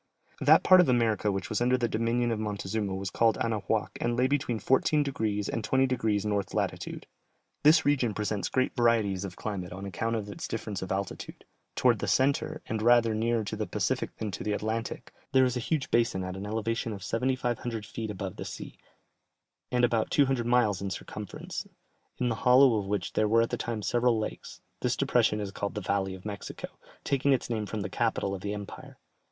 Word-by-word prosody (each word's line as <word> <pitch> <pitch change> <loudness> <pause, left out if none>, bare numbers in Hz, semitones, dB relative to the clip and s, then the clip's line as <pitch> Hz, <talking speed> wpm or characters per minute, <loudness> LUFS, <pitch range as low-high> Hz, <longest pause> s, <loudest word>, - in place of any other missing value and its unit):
That - - +6
part 185 -1 +8
of 175 - +2
America 115 -4 +2
which 95 -2 -3
was 110 - -1
under 125 +1 +3
the 120 -2 0
dominion 115 +2 0
of 110 - -1
Montezuma 105 -1 -2
was 95 -1 -4
called 115 -1 +3
Anahuac 110 -3 -1
and 120 0 0
lay 125 - +3
between 130 -4 0
14 140 +5 +2
degrees 110 -7 -1
and 115 - -3
20 130 +4 +3
degrees 110 -5 0
north 100 -2 -1
latitude. - - -3 0.6
This 160 +2 +6
region 130 -7 +2
presents 105 -2 -2
great 130 0 0
varieties 110 -6 +2
of 90 -2 -7
climate 95 -5 -4
on 95 +2 -6
account 115 +4 -2
of 105 -2 -3
its 100 - -6
difference 105 -3 -4
of 95 - -5
altitude; 95 0 -4 0.3
towards - - +3
the - - -3
centre, 140 +3 +1
and 110 -1 -3
rather 115 -1 +5
nearer 115 +1 +1
to 105 +1 -4
the 110 0 -3
Pacific - - -2
than 105 -2 -3
to - - -5
the 105 - -1
Atlantic, 110 +2 -3 0.2
there 130 0 +6
is 125 -1 0
a - - -1
huge 140 +3 -2
basin 115 -5 +2
at 90 0 -5
an 100 +2 -6
elevation 115 +1 -2
of 100 -2 -8
7500 120 -2 -1
feet 110 +1 -5
above 95 -2 -5
the - - -4
sea, - - -8 0.9
and 125 -1 +4
about 115 -2 0
200 135 -4 +2
miles 120 -6 +3
in 100 - -2
circumference, 100 +2 -6 0.5
in 125 - 0
the - - +1
hollow 125 -2 +6
of 100 - -5
which 100 -3 -2
there 110 - +2
were 115 +2 +4
at 115 - -3
that - - -2
time 115 -3 -3
several 120 +4 +2
lakes; 110 - -5 0.2
this - - 0
depression 105 - +2
is 100 -2 -4
called 100 0 -4
the - - -1
valley 95 0 -1
of 95 - -14
Mexico, 105 -1 -6 0.3
taking 140 0 +2
its 125 -2 -1
name 110 -2 -2
from 110 0 -4
the - - -2
capital 100 - 0
of 95 - -5
the 105 +1 -3
empire. 100 -1 -9
110 Hz, 205 wpm, -29 LUFS, 100-120 Hz, 0.9 s, part